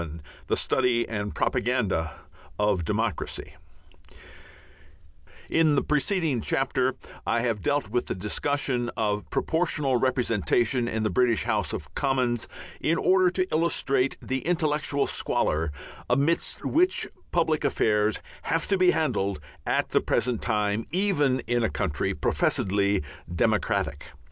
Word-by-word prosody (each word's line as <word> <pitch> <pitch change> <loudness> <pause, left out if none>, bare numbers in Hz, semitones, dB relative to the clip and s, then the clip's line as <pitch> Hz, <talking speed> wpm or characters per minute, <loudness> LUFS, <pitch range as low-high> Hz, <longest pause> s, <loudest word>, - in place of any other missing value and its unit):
XI 85 - -5 0.4
THE - - +1
STUDY 125 -2 +1
AND 105 -2 -4
PROPAGANDA 100 -9 0 0.4
OF 105 -4 +1
DEMOCRACY 105 +1 -2 1.9
In 160 -2 +3
the 140 - +2
preceding 150 - +1
chapter 130 +2 +1 0.3
I 115 - +2
have 115 -4 -1
dealt 145 -5 0
with 120 +1 0
the - - -2
discussion 120 +5 -1
of 105 -2 -1
Proportional 150 -6 +1
Representation 120 0 +1
in 110 -1 -1
the 110 - 0
British 120 +1 +2
House - - 0
of - - -6
Commons 125 -4 0 0.3
in 165 +2 +1
order 185 -1 +4
to 185 +1 -1
illustrate 140 -5 +1
the 130 0 -1
intellectual 155 -3 0
squalor 80 0 0 0.4
amidst 140 +7 +1
which 360 +4 +2 0.2
public 160 -3 +1
affairs 110 -6 +1 0.2
have 165 0 -1
to 195 -2 +2
be 185 -1 +5
handled 105 - 0 0.3
at - - +1
the - - +2
present 120 -2 0
time, 105 +1 0
even 155 -9 +2
in 120 0 0
a 115 - +2
country 85 -8 -1
professedly 100 -1 +1 0.3
"democratic." 70 -3 0
125 Hz, 125 wpm, -26 LUFS, 105-150 Hz, 1.9 s, be